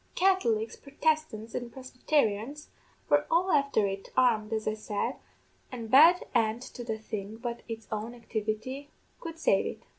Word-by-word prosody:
Catholics, 235 - +2
Prodestants, 285 -6 -1
an' 245 -1 -4
Prosbytarians, 255 +1 -1 0.4
were 290 0 +3
all 360 +3 +3
afther 280 -7 +3
it, 195 0 -4
armed, 230 -4 +3
as 220 -1 -2
I 215 - +2
said, 215 -1 -3 0.5
an' 235 -3 -6
bad 325 +8 +7
end 230 0 +1
to 245 - -8
the 225 -2 -3
thing 215 -1 -6
but 235 0 -5
its 225 -1 -7
own 220 +3 -4
activity 230 +4 -4 0.3
could 330 -1 -7
save - - +2
it. - - -7
235 Hz, 150 wpm, -29 LUFS, 220-285 Hz, 0.5 s, bad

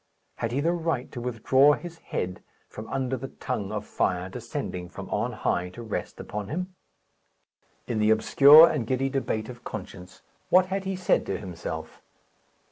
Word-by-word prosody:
Had 115 - -2
he 135 +4 0
the 170 +3 +2
right 165 -7 -2
to 120 - -6
withdraw 130 +4 +4
his 170 +1 -7
head 90 0 -4 0.3
from 110 +1 -9
under 135 -1 -1
the 135 - -6
tongue 105 -7 -4
of 105 -1 -4
fire 90 0 -1
descending 115 -5 -5
from - - -8
on - - 0
high 90 +1 -1
to 115 +6 -10
rest 110 - -5
upon 105 -1 -5
him? 180 +5 -4 1.1
In 115 -3 -2
the 105 0 +3
obscure 140 +8 +8
and 120 -7 -2
giddy 130 +2 0
debate 120 -5 -2
of 125 -1 -10
conscience, 90 -3 -9 0.3
what 185 0 +6
had 190 +1 -3
he 190 0 -2
said 185 -1 +2
to 95 - -1
himself? 85 -4 -7
120 Hz, 170 wpm, -26 LUFS, 105-145 Hz, 1.1 s, obscure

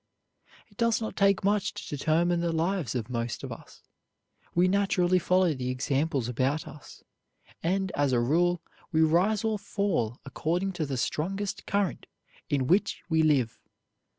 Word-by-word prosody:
It - - -26
does 230 -2 +2
not 220 - -4
take 195 -1 +3
much 205 0 +1
to - - -5
determine 170 +4 +2
the 170 0 0
lives 165 - -1
of 115 -3 -2
most 120 -1 -3
of - - -5
us. - - -11 0.7
We 175 +2 +4
naturally 185 -2 +2
follow 180 -1 +3
the 125 -2 -3
examples 135 0 0
about 130 +5 -1
us, 150 - -12 0.6
and, 190 +2 0
as 145 -2 +1
a 125 - +3
rule, 170 +8 +2 0.3
we 160 -1 +3
rise 185 +7 +3
or 220 -2 0
fall 160 - -1
according 175 +7 -1
to 160 -4 -2
the 135 -2 -3
strongest 195 +10 -2
current 200 -2 -1 0.4
in 140 -3 +1
which 185 +10 +1
we 160 -1 +3
live. 140 -7 +2
170 Hz, 155 wpm, -28 LUFS, 140-195 Hz, 0.7 s, We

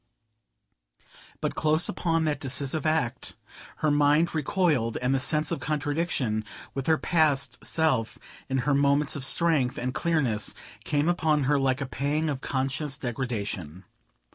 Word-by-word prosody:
But - - -1
close 155 +2 +2
upon 165 -2 0
that 150 -2 0
decisive 140 +3 -2
act, 145 -6 0 0.5
her 150 - +4
mind 145 +3 +3
recoiled; 150 - +1
and 125 +2 0
the 135 - +2
sense 150 +4 +1
of 170 - -1
contradiction 145 -7 -1 0.3
with 135 -1 -4
her 160 -1 +4
past 145 -7 +1
self 135 -9 0 0.3
in 135 - 0
her 145 - +3
moments 140 +2 +2
of 140 - -4
strength 145 -4 +2
and 125 +1 -2
clearness 135 -12 0 0.3
came 145 +1 +1
upon 160 -4 +2
her 145 +2 +2
like 135 0 +1
a - - -1
pang 145 +4 -1
of 135 -2 -5
conscious 135 +1 -2
degradation. 105 - -4
145 Hz, 140 wpm, -27 LUFS, 130-155 Hz, 0.5 s, her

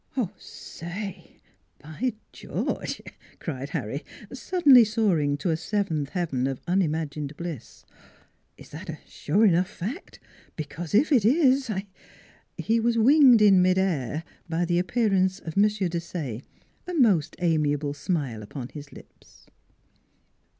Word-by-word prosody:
" 225 -8 -2
Say! 180 +2 -9 0.4
by 160 - -4 0.2
George! - - -4 0.2
" - - -26
cried - - -5
Harry, - - -4 0.3
suddenly 290 -10 +5
soaring 190 -10 +1
to 170 +4 -1
a - - +1
seventh 165 -5 -2
heaven 140 -8 -1
of 135 -2 -4
unimagined 155 -5 -1
bliss. 165 -9 -8 0.3
" - - -38
Is - - -14
that - - -9
a - - -5
sure 200 +9 +1
enough 180 -1 +3
fact? 220 - -7 0.4
Because 160 +3 -5
if 285 +9 +4
it 250 -8 +4
is 265 +2 +3
j 200 -3 -3 0.7
He 230 +1 +1
was 230 +1 +1
winged 250 -1 +6
in 195 -3 +6
mid 185 0 +3
air 160 - -1 0.3
by 170 +2 0
the 175 0 +1
appearance 190 -2 +1
of 160 -5 -8
M. 200 - +5
Desaye, 170 - -3 0.5
a 360 - -4
most 210 - +3
amiable 150 -4 0
smile 145 - -3
upon 120 +4 -7
his 145 -2 -10
lips. - - -17
180 Hz, 135 wpm, -26 LUFS, 155-215 Hz, 0.7 s, winged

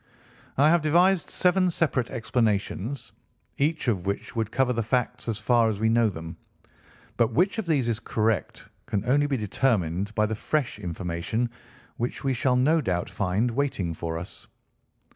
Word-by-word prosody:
"I 140 +3 +5
have 170 -1 +4
devised 175 +4 +3
seven 185 0 +2
separate 145 -8 0
explanations, 115 0 -1 0.5
each 150 +1 0
of 95 -6 0
which 100 +4 -3
would 110 -1 -1
cover 125 0 +2
the 115 - 0
facts 125 +2 -1
as 115 -3 -1
far 115 0 +3
as 105 -2 -3
we 110 0 +2
know 115 -1 +3
them. 80 -3 -8 0.8
But 115 - +2
which 195 +6 +2
of 210 - -4
these 140 -7 +1
is 115 -2 0
correct 110 -2 -1 0.2
can 105 +1 -1
only 145 +3 +3
be 140 -2 0
determined 100 -3 0
by 105 - +3
the 110 - -2
fresh 130 +1 -1
information 90 +6 -3 0.5
which 120 +3 -3
we 135 -1 +1
shall 130 0 +1
no 150 +6 +3
doubt 90 -8 -2
find 100 +5 0
waiting 115 -10 -1
for 80 0 -4
us. 85 +2 -9
115 Hz, 165 wpm, -26 LUFS, 105-140 Hz, 0.8 s, I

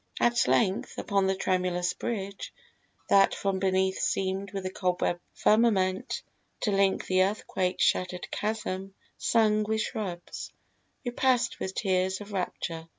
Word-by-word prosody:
At 240 0 +3
length, 195 -3 +1
Upon 195 -2 +1
the 190 - +1
tremulous 180 -1 0
bridge, 200 -4 -4 0.6
that 195 -1 +5
from 195 -1 -1
beneath 190 0 +1
Seemed 195 +1 -1
with 195 -2 -5
a 185 - -2
cobweb 180 -2 0 0.2
firmament 205 -4 +2 0.4
to 210 - +1
link 195 -1 +2
The 185 0 +3
earthquake 190 -2 0
shattered 180 0 +1
chasm, 195 -3 -3 0.3
hung 215 -2 +3
with 220 +1 0
shrubs, 185 -6 -5 0.5
We 245 - -1
passed 245 -1 +1
with 190 - -4
tears 190 -1 +1
of 205 0 -9
rapture. 165 -3 -3
195 Hz, 135 wpm, -28 LUFS, 185-210 Hz, 0.6 s, that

